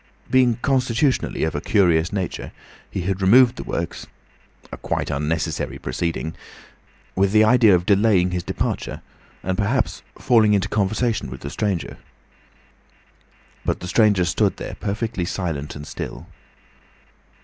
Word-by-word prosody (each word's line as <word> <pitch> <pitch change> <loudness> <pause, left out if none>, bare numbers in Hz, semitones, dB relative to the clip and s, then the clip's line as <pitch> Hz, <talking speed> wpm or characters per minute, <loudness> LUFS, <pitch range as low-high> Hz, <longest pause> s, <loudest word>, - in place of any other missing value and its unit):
Being 125 -3 +4
constitutionally 130 0 +1
of 80 - 0
a 75 - -3
curious 85 -5 +2
nature, 95 -3 -4 0.4
he 95 - -4
had 95 +2 -2
removed 120 +6 +6
the - - -6
works—a - - -8
quite - - -3
unnecessary 80 +2 -2
proceeding—with 85 +5 -5
the 110 +1 +5
idea 110 -3 +6
of 90 0 -1
delaying 100 -3 +3
his 90 0 -1
departure - - -3 0.4
and 95 0 -1
perhaps 100 -4 0 0.2
falling 110 -3 +4
into 100 0 0
conversation 110 - 0
with 65 +1 -9
the 70 - -6
stranger. 100 -7 -2 1.7
But - - -1
the 90 - -7
stranger 105 -2 +3
stood 85 - +1
there, - - -6
perfectly 105 -1 -2
silent 85 -6 -3
and 75 0 -8
still. - - -7
95 Hz, 125 wpm, -22 LUFS, 85-110 Hz, 1.7 s, removed